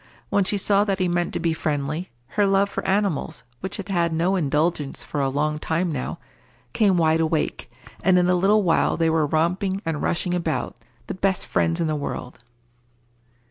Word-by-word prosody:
When 200 - +3
she 205 - +1
saw 200 +1 +3
that 195 -2 0
he 185 -1 +1
meant 175 0 0
to - - -1
be 165 -1 +1
friendly, 155 +2 -2 0.2
her 205 -1 +2
love 195 +1 +2
for - - -3
animals, 195 -5 0 0.2
which 190 - -5
had 200 -1 -7
had 170 -3 +1
no 170 +4 +1
indulgence 150 -2 0
for 145 - -3
a 135 - +1
long 150 +2 -1
time 165 +3 -1
now, 130 -4 -4 0.6
came 200 -4 +3
wide 160 -1 +3
awake, 160 -1 -1 0.3
and 185 0 +4
in 180 0 +3
a 180 - +3
little 200 +4 +3
while 170 -3 +2
they 165 -1 +2
were 160 -2 +2
romping 180 +5 0
and 160 -2 -2
rushing 175 +1 0
about, 165 -3 -2 0.3
the - - -4
best 190 0 0
friends 165 +1 0
in 170 - +1
the 155 -1 0
world. 140 -4 -5
170 Hz, 190 wpm, -23 LUFS, 155-190 Hz, 0.6 s, and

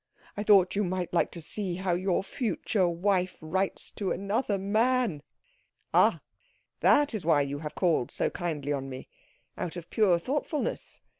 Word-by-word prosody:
I 205 - -3
thought 200 -3 +5
you 205 - +2
might 180 -2 -2
like 170 - +2
to 170 - -9
see 190 0 -3
how 185 0 -1
your 185 +1 0
future 210 -4 0
wife 180 +2 0
writes 190 +5 -2
to 200 -3 -3
another 200 +3 0
man." 215 - +1 0.7
"Ah - - +4 0.6
that 290 -2 +4
is 215 -5 -3
why 155 -3 +4
you 140 +1 -4
have 150 -1 -6
called 165 -9 +1
so - - -1
kindly 150 -5 -2
on 135 -1 -4
me? 130 0 -8 0.5
Out 175 - -3
of 170 -2 -9
pure 200 -6 +4
thoughtfulness. 290 - -3
185 Hz, 160 wpm, -28 LUFS, 170-205 Hz, 0.7 s, thought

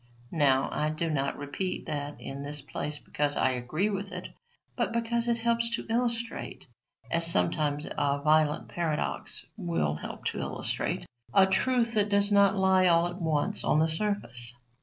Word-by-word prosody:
Now, 135 -4 +3
I 150 0 0
do 155 +1 -2
not 140 -2 -1
repeat 145 +6 -4
that 145 0 -4
in 135 +1 -6
this 145 +1 -2
place 150 +1 -4
because 145 0 -1
I 130 - +3
agree 140 - -1
with 195 0 -4
it, 180 0 -6 0.5
but - - 0
because 235 0 0
it 235 -1 +2
helps 235 0 +1
to - - -6
illustrate, 235 -1 -2 0.5
as 170 - +3
sometimes 145 - +1
a 145 0 0
violent 155 0 +3
paradox 165 -3 -3
will 80 -4 0
help 75 - -7
to - - -5
illustrate, - - -2 0.3
a 195 -1 +8
truth 235 +4 +1
that 210 -2 +2
does 200 0 +3
not 200 -1 +5
lie 190 -1 +4
all 170 -1 +4
at 175 +2 -5
once 155 -3 +1
on - - +2
the 160 +1 +4
surface. 155 - -1
165 Hz, 165 wpm, -29 LUFS, 145-200 Hz, 0.5 s, a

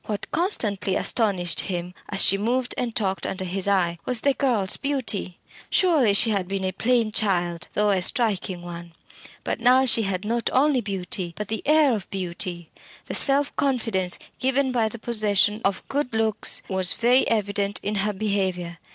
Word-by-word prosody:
What 210 -2 -5
constantly 215 - 0
astonished 190 -7 +1
him, 180 -2 -3 0.2
as 195 -1 +1
she 195 - +4
moved 240 +5 -1
and 235 -2 -3
talked 195 -4 -1
under 190 0 -4
his 190 +2 0
eye, 175 -4 +1
was 245 -3 0
the 280 - +2
girl's 235 -9 0
beauty. 255 -10 -2 0.3
Surely 305 - +3
she 225 +2 +4
had 195 -4 -1
been 195 0 -3
a 185 - -1
plain 225 +3 +1
child, 175 -5 0
though 210 0 +2
a 190 -2 +1
striking 195 -5 +1
one. 170 -1 -9 0.5
But - - -3
now 250 +2 +4
she 230 -2 +4
had 195 -1 -3
not 230 +2 -1
only 270 -1 +3
beauty, 185 -4 -4
but 210 -1 -5
the 220 -1 -3
air 305 -3 +4
of 200 -5 -7
beauty. 175 -2 -5 0.3
The - - -6
self 280 0 +4
confidence 225 -9 -1 0.2
given 265 +1 +1
by 230 -3 0
the 235 - -9
possession 210 -2 +2
of 195 0 -2
good 275 -4 -2
looks 220 -1 +1
was 190 -2 +1
very 245 +3 +2
evident 205 -2 -1
in 205 - -2
her 210 +1 -1
behaviour. 190 -4 -2
210 Hz, 175 wpm, -23 LUFS, 190-245 Hz, 0.5 s, she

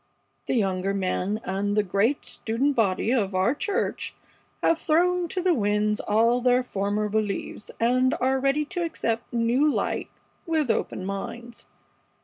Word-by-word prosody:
The - - 0
younger 195 -3 0
men, 195 +2 -1
and 200 +2 -1
the 210 - +4
great 205 +8 +1
student 255 +5 -1
body 215 -1 +1
of 205 -7 +1
our 190 +7 +3
church, 390 +7 -2 0.5
have 330 - +3
thrown 355 +2 +2
to 365 +2 -3
the 365 -1 +4
winds 210 -3 +1
all 230 +4 +2
their 250 0 +3
former 205 -1 -1
beliefs 210 -1 -3
and 255 +3 +3
are 265 +1 +2
ready 275 +3 +1
to 355 +3 -3
accept 230 -8 -2
new 240 +6 +2
light - - -2 0.4
with 310 -7 +1
open 185 - -2
minds. 235 +5 -6
230 Hz, 145 wpm, -25 LUFS, 205-275 Hz, 0.5 s, the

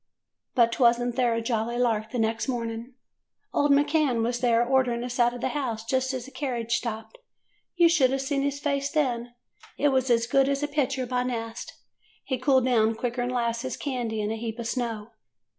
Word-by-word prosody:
"But 235 -1 +3
was 240 -1 +5
n't 245 -1 -2
there 245 -3 +2
a 230 - -2
jolly 230 0 -1
lark 225 -3 +1
the 245 - -4
next 225 +1 0
morning! 235 0 -4 0.6
Old 290 - +2
McCann 285 -4 +3
was 240 +1 -1
there 240 -1 +3
ordering 250 -2 +2
us 245 0 -5
out 240 0 +4
of 245 - -8
the - - 0
house, 235 -7 -3
just 260 +2 0
as 255 -2 -4
the 270 - -12
carriage 250 -4 -3
stopped. 235 - -3 0.6
You 345 -1 +6
should 285 -7 +3
a' 270 - +1
seen 275 +1 -1
his 280 0 -1
face 280 -1 -1
then. 245 -6 -1 0.4
It 290 - +3
was 260 -1 +1
as 230 -1 +3
good 270 +3 +3
as 280 +1 -1
a - - +1
picture 275 -3 -1
by 250 0 -1
Nast. 230 -2 -4 0.5
He 260 -2 -3
cooled 260 -1 +3
down 225 -3 +3
quicker 245 +1 -2
'n 245 - -1
'lasses 240 +1 -2
candy 240 -6 -3
in 210 +1 -2
a 225 - -3
heap 225 0 -5
of 235 - -5
snow. 230 -2 -3
245 Hz, 205 wpm, -26 LUFS, 230-270 Hz, 0.6 s, You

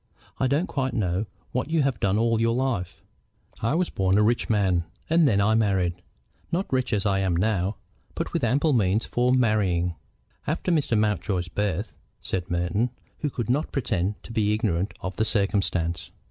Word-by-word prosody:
"I 130 - +2
don't 145 +7 +1
quite 130 -6 -2
know 95 -1 0 0.2
what 125 +4 -2
you 160 -2 +2
have 135 -2 0
done 100 +1 +2
all 115 0 +2
your 115 0 +2
life." 120 -9 -2 0.6
"I 115 +7 +1
was 180 +1 0
born 95 0 +2
a 105 - +5
rich 120 +3 +1
man, 95 -6 +2 0.3
and 165 -2 +5
then 100 -6 +3
I 100 +2 +3
married, 95 -5 +1 0.5
not 175 -3 -1
rich 130 -1 +1
as 105 -2 0
I 100 -1 +2
am 95 -3 +1
now, 95 +1 +1 0.4
but - - -3
with - - -1
ample 140 +6 +2
means 105 -1 +2
for 125 +1 +1
marrying." 100 -8 +2 0.5
"After 165 +4 -1
Mr. 145 -8 +2
Mountjoy's 105 -4 0
birth," 105 +2 -2 0.3
said 90 -2 -4
Merton, 90 +7 0 0.3
who 150 - -1
could 120 -5 -4
not 140 +6 0
pretend 105 - -1
to - - -10
be 105 -1 +2
ignorant 100 -4 -1
of 95 0 -5
the 110 - +2
circumstance. 100 -5 0
105 Hz, 180 wpm, -25 LUFS, 95-125 Hz, 0.6 s, a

